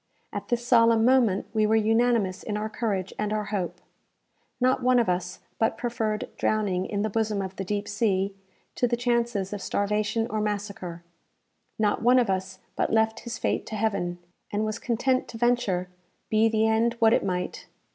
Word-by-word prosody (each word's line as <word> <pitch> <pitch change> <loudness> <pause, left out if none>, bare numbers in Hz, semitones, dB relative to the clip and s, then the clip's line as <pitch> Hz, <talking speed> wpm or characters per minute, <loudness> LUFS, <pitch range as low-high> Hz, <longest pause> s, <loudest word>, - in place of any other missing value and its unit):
At 205 0 -5
this 240 0 -1
solemn 230 -2 +5
moment, 240 -7 +3
we 215 -1 +3
were 220 - +3
unanimous 225 -3 +2
in 210 -1 -3
our 215 +1 -3
courage 200 -5 -2
and 210 0 -1
our 215 0 0
hope. 185 -4 -2 0.8
Not 255 +1 +2
one 250 0 +4
of 235 - +3
us 180 0 -2 0.2
but 225 - +1
preferred 225 -3 -2
drowning 195 -4 0
in 205 -1 -2
the 215 - 0
bosom 215 -1 0
of 190 -1 -4
the 195 - -4
deep 205 +2 -2
sea, 200 -2 0 0.4
to 245 - +1
the 240 0 0
chances 235 -5 0
of 205 - -5
starvation 210 +3 0
or 215 0 -1
massacre. 200 -5 -4 0.7
Not 210 -1 +1
one 245 +2 +5
of 240 -6 +3
us 190 0 -3 0.2
but - - 0
left 220 0 +2
his 235 -1 -6
fate - - -1
to 220 - -5
Heaven, 200 -5 -1 0.3
and 210 +1 0
was 215 0 -3
content 255 +2 0
to 225 - -8
venture, 225 -7 +1 0.4
be 220 +1 +4
the 220 0 +2
end 225 +2 +2
what 225 -1 +5
it - - +2
might! 180 -1 -3
215 Hz, 185 wpm, -26 LUFS, 200-230 Hz, 0.8 s, solemn